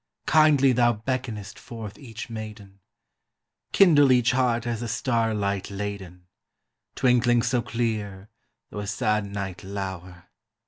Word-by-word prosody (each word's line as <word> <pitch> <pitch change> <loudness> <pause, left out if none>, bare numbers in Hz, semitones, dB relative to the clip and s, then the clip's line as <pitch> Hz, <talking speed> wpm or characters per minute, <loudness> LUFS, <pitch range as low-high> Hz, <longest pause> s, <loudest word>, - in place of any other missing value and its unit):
Kindly 150 -4 +5
thou 120 -1 +3
beckonest 110 -3 -4
forth 115 -4 -9
each 115 -4 -8
maiden; 105 -3 -9 0.9
Kindle 145 -8 +6
each 120 -2 +4
heart 120 -2 +1
as 120 -1 -3
a 120 - -3
star 115 -1 0
light 100 -1 -2
laden, 100 -3 -6 0.7
Twinkling 120 -2 +3
so 125 -2 +1
clear, 105 -4 -3 0.4
though 105 - -6
a 105 - -5
sad 105 -1 0
night 100 -2 -6
lower! 95 -2 -7
110 Hz, 125 wpm, -25 LUFS, 100-120 Hz, 0.9 s, Kindle